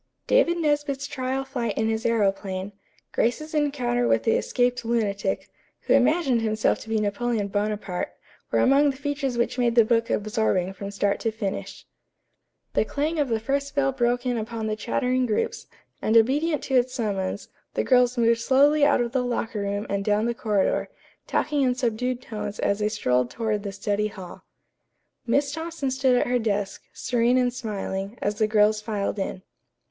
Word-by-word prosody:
David 345 -9 +3
Nesbit's 290 -3 0
trial 270 -1 -3
flight 240 -5 -3
in 220 - +1
his 225 +1 -1
aëroplane, 195 -3 0 0.4
Grace's 305 +7 -1
encounter 255 -5 +1
with - - +2
the 225 - +2
escaped 245 +1 +1
lunatic, 205 -4 -1 0.3
who - - +1
imagined 280 -8 +3
himself 215 -1 +1
to 225 - -11
be 220 -1 +1
Napoleon 210 0 -1
Bonaparte, 205 -2 -2 0.4
were - - +1
among 280 +2 +5
the 270 - -4
features 285 -3 -2
which 235 +2 0
made 235 -1 +2
the 230 -2 +6
book 230 0 +1
absorbing 210 -4 0
from 200 +1 -6
start 200 0 0
to 225 - 0
finish. 210 -3 -5 0.9
The - - +3
clang 305 +3 -2
of 285 -3 +1
the 225 -1 +1
first 280 +4 -2
bell 275 -1 +2
broke 245 -1 0
in 245 -2 0
upon 220 0 -4
the 215 0 -1
chattering 250 +3 0
groups, 215 - -2 0.3
and 220 +1 +3
obedient 290 +7 +2
to 270 - -4
its 250 +1 +1
summons, 200 -5 -2 0.3
the - - +1
girls 250 -1 +3
moved 230 0 +3
slowly 285 +4 +4
out 285 -3 +4
of 235 -1 -1
the 260 0 +1
locker 235 -3 -2
room 200 +1 -2
and 200 0 -1
down 210 +1 +1
the 235 - 0
corridor, 210 -4 0 0.4
talking 295 -1 0
in 250 -2 +2
subdued 250 0 -1
tones 210 -2 -5
as 200 - 0
they 210 0 +1
strolled 125 - +1
toward 215 - -2
the 200 -1 -5
study 205 +1 -1
hall. 190 -4 -10 0.8
Miss 280 +4 +2
Thompson 320 -3 -3
stood 260 -1 +2
at - - +2
her 250 0 +1
desk, 205 -3 -2
serene 245 0 +1
and 250 -1 +2
smiling, 205 -3 -4
as 205 +1 -2
the 215 - +3
girls 210 0 +3
filed 210 -1 -2
in. 185 -1 -4
235 Hz, 175 wpm, -25 LUFS, 210-260 Hz, 0.9 s, the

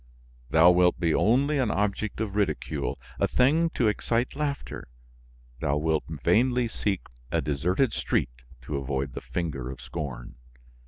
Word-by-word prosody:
Thou 80 +5 +7
wilt 90 0 +3
be 85 -3 +2
only 140 +6 +3
an 125 -4 +1
object 105 +1 -1
of 105 -3 -3
ridicule, 100 -7 -1 0.2
a - - +3
thing 155 +6 +3
to 120 - +2
excite 115 +4 0
laughter; 145 -1 -4 0.7
thou 70 +3 0
wilt 80 0 0
vainly 120 - +2
seek 100 -3 -2 0.3
a - - +2
deserted 90 - +1
street - - 0 0.3
to 75 - -3
avoid 65 0 -2
the - - -6
finger 70 -8 -4
of 65 -1 -7
scorn. 65 -3 -6
90 Hz, 145 wpm, -27 LUFS, 75-120 Hz, 0.7 s, Thou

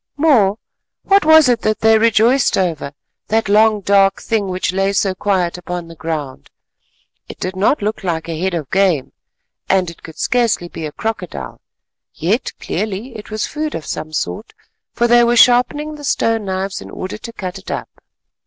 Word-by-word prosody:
More, 235 -10 +3 0.5
what 395 -3 +3
was 315 -2 +7
it 240 -2 +2
that 215 0 -1
they 220 0 +5
rejoiced 230 +4 +3
over, 165 -6 -1 0.3
that 225 0 +1
long 215 +1 +4
dark 195 0 +3
thing 220 -4 -1
which 185 0 -2
lay 195 +1 +1
so 195 -1 +1
quiet 185 -2 -1
upon 180 -1 -5
the 165 - -12
ground? 150 - -5 0.8
It - - -10
did 185 +1 -4
not 205 +5 +1
look 215 0 -2
like 165 -3 -2
a 165 -1 -4
head 190 -1 0
of 150 -6 -5
game, 190 -8 +1 0.6
and 185 -3 +2
it 170 - -18
could 160 - -12
scarcely 230 -8 0
be 160 -2 -5
a - - -8
crocodile, 210 -1 -5 0.5
yet 205 - -1
clearly 210 +5 -4
it 210 - -9
was 215 0 -2
food 305 0 -4
of 160 - -6
some 155 - -5
sort, 90 - -4 0.4
for 240 - +1
they 240 0 +6
were 235 0 +3
sharpening 255 +6 +4
the 295 -1 -10
stone 225 -5 0
knives 190 +1 -3
in - - -10
order 185 +3 -6
to 230 - -8
cut 185 -5 -6
it - - -12
up. - - -6
200 Hz, 180 wpm, -18 LUFS, 180-230 Hz, 0.8 s, was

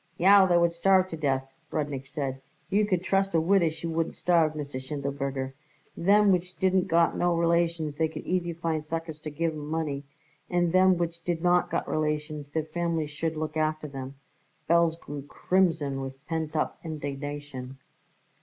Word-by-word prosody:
"Yow, 195 +1 +7
they 175 -1 +4
would 170 0 +3
starve 185 +2 +4
to 165 - -4
death!" 135 -4 0 0.2
Rudnik 145 -3 -3
said. 135 -2 -4 0.3
"You 205 +1 +3
could 185 -3 0
trust 195 -1 +1
a - - +5
widder 170 0 +3
she 160 +2 -8
wouldn't 165 0 -1
starve, 165 -3 +3
Mr. 145 -3 -5
Schindelberger. 140 -1 -3 0.4
Them 200 +3 +4
which 180 0 0
didn't 190 -1 +2
got 165 0 +3
no 175 -1 +2
relations 170 -3 +1
they 160 - +2
could 155 -1 -8
easy 175 -1 0
find 165 -2 -2
suckers 160 0 -5
to 155 - -6
give 160 +2 -1
'em 150 -1 -6
money, 155 -3 -2 0.5
and 175 -1 +2
them 185 0 +5
which 170 -1 -3
did 170 -1 -2
got 175 0 +2
relations, 150 -1 -2
their 155 +2 -1
families 160 -1 -2
should 160 +2 -3
look 155 0 -3
after 155 -2 -1
'em." 135 +1 -6 0.5
Belz 170 0 +3
grew 145 -3 -7
crimson 150 -2 0
with 135 0 -8
pent 160 -1 -3
up 155 - -1
indignation. 145 -3 -6
160 Hz, 170 wpm, -27 LUFS, 145-170 Hz, 0.5 s, Yow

